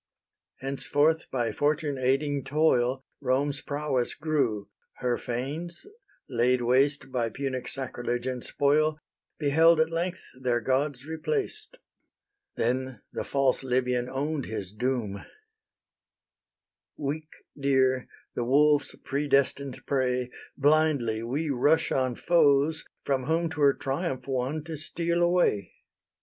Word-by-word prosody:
Henceforth, 145 Hz, +4 st, +1 dB
by 120 Hz, -3 st, -1 dB
fortune 145 Hz, -1 st, 0 dB
aiding 135 Hz, +2 st, +1 dB
toil, 135 Hz, -3 st, +2 dB
Rome's 140 Hz, +2 st, 0 dB
prowess 145 Hz, -4 st, -1 dB
grew: 135 Hz, -10 st, 0 dB, 0.3 s
her 125 Hz, -1 st, 0 dB
fanes, 145 Hz, -, -4 dB, 0.4 s
laid 125 Hz, -1 st, +2 dB
waste 135 Hz, +3 st, +2 dB
By 120 Hz, -3 st, 0 dB
Punic 130 Hz, +1 st, -4 dB
sacrilege 120 Hz, -2 st, -3 dB
and 130 Hz, -2 st, -3 dB
spoil, 150 Hz, +2 st, +2 dB, 0.4 s
Beheld 160 Hz, +3 st, +4 dB
at 160 Hz, +1 st, +2 dB
length 175 Hz, +2 st, -2 dB, 0.2 s
their 125 Hz, -2 st, +1 dB
gods 135 Hz, +2 st, 0 dB
replaced. 425 Hz, -, -3 dB, 0.8 s
Then 125 Hz, -1 st, -1 dB
the -, -, -3 dB
false 135 Hz, -2 st, +1 dB
Libyan 125 Hz, -1 st, 0 dB
own'd 145 Hz, +1 st, -2 dB
his 100 Hz, -3 st, -5 dB
doom: 115 Hz, -3 st, -2 dB, 1.7 s
"Weak 155 Hz, +2 st, -4 dB, 0.2 s
deer, 130 Hz, -2 st, +2 dB, 0.3 s
the 120 Hz, -, -2 dB
wolves' 145 Hz, +4 st, +3 dB
predestined 140 Hz, -1 st, 0 dB
prey, 125 Hz, -2 st, 0 dB, 0.3 s
Blindly 145 Hz, -6 st, +2 dB
we 140 Hz, +7 st, -2 dB
rush 145 Hz, +5 st, +2 dB
on 130 Hz, -2 st, +1 dB
foes, 155 Hz, -1 st, +3 dB, 0.2 s
from 135 Hz, -2 st, 0 dB
whom 165 Hz, +2 st, 0 dB
'Twere 145 Hz, -3 st, +4 dB
triumph 135 Hz, 0 st, -3 dB
won 135 Hz, +3 st, -1 dB
to 160 Hz, -1 st, -6 dB
steal 170 Hz, +2 st, -1 dB
away. 175 Hz, -, +2 dB
140 Hz, 110 wpm, -27 LUFS, 125-155 Hz, 1.7 s, Beheld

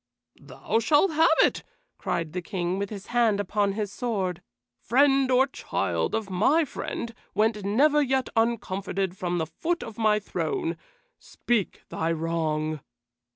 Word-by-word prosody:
"Thou 225 Hz, -, -2 dB
shalt 300 Hz, -, +3 dB
have 320 Hz, +2 st, +4 dB
it!" -, -, +1 dB, 0.4 s
cried 165 Hz, -2 st, -2 dB
the 180 Hz, -, -2 dB
King, 180 Hz, +1 st, -2 dB
with 200 Hz, 0 st, -2 dB
his 200 Hz, -3 st, -8 dB
hand 230 Hz, -4 st, +3 dB
upon 205 Hz, 0 st, 0 dB
his 205 Hz, -1 st, -3 dB
sword. 195 Hz, -7 st, -2 dB, 0.4 s
"Friend 270 Hz, +1 st, +3 dB
or 255 Hz, +1 st, +5 dB
child 270 Hz, -, -2 dB
of 220 Hz, -2 st, -2 dB
my 225 Hz, -, +3 dB
friend 235 Hz, -3 st, -5 dB, 0.2 s
went 210 Hz, 0 st, +1 dB
never 285 Hz, +9 st, +3 dB
yet 265 Hz, -1 st, +1 dB
uncomforted 195 Hz, -5 st, -1 dB
from 175 Hz, -2 st, -2 dB
the 160 Hz, -, 0 dB
foot 335 Hz, -, -3 dB
of 225 Hz, -1 st, -9 dB
my 215 Hz, -1 st, +4 dB
throne. 335 Hz, -, -2 dB, 0.4 s
Speak 230 Hz, -6 st, -2 dB
thy 160 Hz, +1 st, -1 dB
wrong." 155 Hz, -2 st, -1 dB
210 Hz, 145 wpm, -26 LUFS, 185-260 Hz, 0.4 s, or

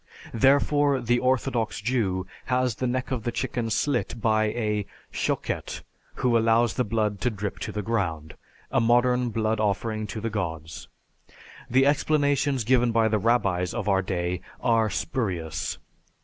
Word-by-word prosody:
Therefore, 140 Hz, +2 st, +3 dB
the 120 Hz, 0 st, +1 dB
orthodox 125 Hz, -3 st, 0 dB
Jew 105 Hz, -5 st, 0 dB, 0.2 s
has 125 Hz, -1 st, +1 dB
the 130 Hz, -, -1 dB
neck 130 Hz, +2 st, -2 dB
of 125 Hz, -3 st, -1 dB
the 120 Hz, -, -2 dB
chicken 120 Hz, -2 st, -2 dB
slit 135 Hz, +1 st, 0 dB
by 110 Hz, -1 st, +2 dB
a 105 Hz, -2 st, -1 dB, 0.3 s
"Shochet" -, -, -2 dB, 0.3 s
who 125 Hz, -2 st, +1 dB
allows 115 Hz, -1 st, +3 dB
the 125 Hz, -, 0 dB
blood 105 Hz, -3 st, -1 dB
to 125 Hz, -, +2 dB
drip 100 Hz, -2 st, -5 dB
to -, -, -4 dB
the 105 Hz, -, -4 dB
ground 85 Hz, -8 st, -2 dB, 0.4 s
a -, -, +3 dB
modern 120 Hz, +1 st, +3 dB
blood 110 Hz, 0 st, 0 dB
offering 110 Hz, +1 st, -1 dB
to 110 Hz, -, -5 dB
the 115 Hz, +1 st, -3 dB
Gods. 80 Hz, -8 st, -4 dB, 0.8 s
The 130 Hz, +2 st, +4 dB
explanations 145 Hz, -2 st, +2 dB
given 120 Hz, 0 st, +3 dB
by 115 Hz, -1 st, +3 dB
the 110 Hz, -1 st, +1 dB
rabbis 95 Hz, -6 st, +1 dB
of 105 Hz, -, -3 dB
our 95 Hz, -2 st, +3 dB
day 90 Hz, -1 st, -2 dB, 0.2 s
are 115 Hz, -2 st, +2 dB
spurious. 90 Hz, -, -2 dB
115 Hz, 150 wpm, -26 LUFS, 105-125 Hz, 0.8 s, The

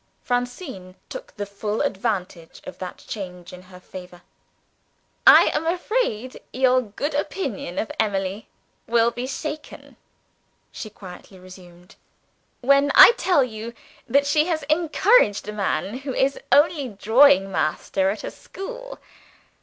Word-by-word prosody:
Francine 245 Hz, -, -4 dB
took -, -, -9 dB
the 205 Hz, -, -4 dB
full 205 Hz, +2 st, -4 dB
advantage 190 Hz, -, -3 dB
of -, -, -10 dB
that 185 Hz, -1 st, -8 dB
change 180 Hz, -4 st, -7 dB
in 180 Hz, -, -10 dB
her 185 Hz, 0 st, -15 dB
favor. 180 Hz, -1 st, -12 dB, 1.0 s
"I -, -, +8 dB
am 325 Hz, -, -1 dB
afraid 340 Hz, -, -2 dB
your 255 Hz, 0 st, +3 dB
good 250 Hz, +7 st, -5 dB
opinion 275 Hz, -, -4 dB
of -, -, -2 dB
Emily 200 Hz, -1 st, -2 dB, 0.4 s
will 235 Hz, 0 st, +3 dB
be 245 Hz, +2 st, -5 dB
shaken," 300 Hz, +2 st, -7 dB, 0.7 s
she 215 Hz, -, -8 dB
quietly 190 Hz, -1 st, -13 dB
resumed, 180 Hz, -1 st, -15 dB, 0.6 s
"when 280 Hz, +2 st, +4 dB
I -, -, +11 dB
tell 360 Hz, -, +2 dB
you 230 Hz, -1 st, -7 dB, 0.3 s
that 280 Hz, +4 st, +3 dB
she 300 Hz, +2 st, +2 dB
has 320 Hz, -4 st, -1 dB
encouraged 325 Hz, -, +3 dB
a 210 Hz, -, -5 dB
man 200 Hz, +2 st, -2 dB
who 270 Hz, -1 st, -5 dB
is 275 Hz, +1 st, +1 dB
only 290 Hz, -2 st, +3 dB
drawing 220 Hz, +1 st, +4 dB
master 190 Hz, +4 st, 0 dB
at 205 Hz, +2 st, -4 dB
a -, -, -5 dB
school. -, -, -9 dB
230 Hz, 130 wpm, -23 LUFS, 190-285 Hz, 1.0 s, I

